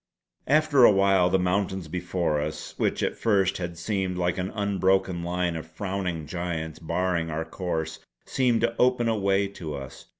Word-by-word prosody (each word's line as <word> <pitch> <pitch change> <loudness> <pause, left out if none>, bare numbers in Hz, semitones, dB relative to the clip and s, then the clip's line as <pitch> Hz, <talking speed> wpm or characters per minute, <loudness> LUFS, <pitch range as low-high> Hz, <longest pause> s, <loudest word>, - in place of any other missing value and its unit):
After 150 -2 +4
a 120 - +9
while 95 -2 +4
the 95 - +3
mountains 95 -1 -1
before 85 -2 -1
us, 75 0 -5
which - - 0
at - - 0
first 95 -4 +1
had 85 -1 -5
seemed 95 -3 -2
like 90 0 0
an 90 +1 -2
unbroken 95 -3 +1
line 90 0 -1
of 80 0 -6
frowning 90 -1 -3
giants 80 -1 -4
barring 85 0 -1
our 80 +1 -3
course, 85 -4 -3 0.3
seemed 125 -3 +1
to 115 0 +1
open 125 -1 +3
a 115 - +2
way 100 -1 +1
to 80 -6 -6
us. 65 -1 -9
90 Hz, 170 wpm, -26 LUFS, 85-100 Hz, 0.3 s, a